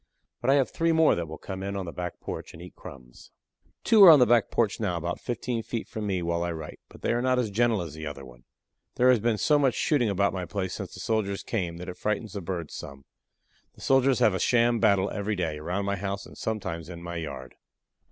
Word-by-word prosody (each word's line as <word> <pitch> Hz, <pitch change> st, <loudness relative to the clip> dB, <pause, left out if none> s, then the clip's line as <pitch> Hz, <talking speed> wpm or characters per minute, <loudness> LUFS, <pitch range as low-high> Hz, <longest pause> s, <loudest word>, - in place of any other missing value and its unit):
But 120 Hz, -, 0 dB
I 135 Hz, -, +6 dB
have 135 Hz, -3 st, +2 dB
three 165 Hz, 0 st, +1 dB
more 160 Hz, -1 st, +5 dB
that 85 Hz, -1 st, -3 dB
will 80 Hz, +1 st, -8 dB
come 95 Hz, -1 st, -7 dB
in 100 Hz, +1 st, -4 dB
on 95 Hz, -2 st, -3 dB
the 85 Hz, -, -6 dB
back 90 Hz, 0 st, -6 dB
porch -, -, -7 dB
and 80 Hz, -, -11 dB
eat 90 Hz, -, -11 dB
crumbs. 60 Hz, -2 st, -13 dB, 0.5 s
Two 220 Hz, -3 st, +6 dB
are 185 Hz, -, +12 dB
on 155 Hz, -, +10 dB
the 125 Hz, -, +6 dB
back 120 Hz, -1 st, +3 dB
porch 110 Hz, -4 st, 0 dB
now 95 Hz, -6 st, -1 dB
about 85 Hz, +1 st, -3 dB
fifteen 120 Hz, 0 st, -3 dB
feet 115 Hz, 0 st, -5 dB
from 110 Hz, -1 st, -5 dB
me 95 Hz, -3 st, -1 dB
while 85 Hz, 0 st, -1 dB
I 85 Hz, 0 st, -1 dB
write, 80 Hz, -1 st, -8 dB
but -, -, -16 dB
they -, -, +1 dB
are 120 Hz, -, 0 dB
not 130 Hz, 0 st, +2 dB
as 120 Hz, -4 st, 0 dB
gentle 110 Hz, -2 st, +2 dB
as 80 Hz, -4 st, -8 dB
the 80 Hz, 0 st, -6 dB
other 70 Hz, -2 st, -7 dB
one. -, -, -15 dB, 0.5 s
There 125 Hz, +1 st, +5 dB
has 125 Hz, -, +3 dB
been 115 Hz, 0 st, +1 dB
so 150 Hz, +6 st, +3 dB
much 135 Hz, -4 st, +2 dB
shooting 130 Hz, -8 st, +1 dB
about 100 Hz, 0 st, +1 dB
my 90 Hz, -2 st, -3 dB
place 95 Hz, +1 st, -3 dB
since -, -, -6 dB
the -, -, -10 dB
soldiers 105 Hz, -3 st, -1 dB
came 90 Hz, -7 st, -3 dB
that 90 Hz, +2 st, -8 dB
it 90 Hz, -, -7 dB
frightens 105 Hz, +1 st, -2 dB
the 100 Hz, -, -4 dB
birds 85 Hz, -3 st, -5 dB
some. 70 Hz, -1 st, -9 dB, 0.7 s
The -, -, -16 dB
soldiers 135 Hz, -1 st, +3 dB
have 105 Hz, -, +4 dB
a 95 Hz, -, -1 dB
sham 120 Hz, -1 st, +3 dB
battle 100 Hz, -3 st, +3 dB
every 105 Hz, +1 st, -2 dB
day, 80 Hz, -5 st, -2 dB
around 90 Hz, +6 st, -2 dB
my 100 Hz, 0 st, -1 dB
house 100 Hz, +1 st, -4 dB
and -, -, -13 dB
sometimes 85 Hz, -7 st, -4 dB
in 85 Hz, -1 st, -9 dB
my 85 Hz, 0 st, -5 dB
yard. 70 Hz, -5 st, -6 dB
100 Hz, 250 wpm, -27 LUFS, 85-120 Hz, 0.7 s, are